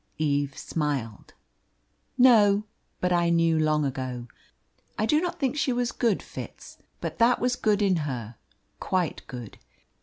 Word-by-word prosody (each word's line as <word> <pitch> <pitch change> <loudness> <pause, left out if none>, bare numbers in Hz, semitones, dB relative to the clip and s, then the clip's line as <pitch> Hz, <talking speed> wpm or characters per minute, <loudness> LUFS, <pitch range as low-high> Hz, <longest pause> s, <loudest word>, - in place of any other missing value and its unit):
Eve 145 -2 0
smiled. 140 -9 -3 0.8
"No; 210 -5 +6 0.4
but 180 0 +2
I 175 -1 +2
knew 165 -1 +3
long 155 -1 +2
ago. 130 -2 -4 0.7
I 215 - +1
do 300 +7 +3
not 350 -1 -3
think 270 -2 0
she 280 -3 +1
was 245 -1 0
good, 230 -5 0
Fitz, - - -10 0.2
but - - -5
that 235 +2 +4
was 250 +1 +1
good 210 -3 +1
in 190 -3 +3
her 125 -7 -4 0.5
quite 180 -4 -1
good. 120 -5 -9
170 Hz, 145 wpm, -26 LUFS, 140-230 Hz, 0.8 s, No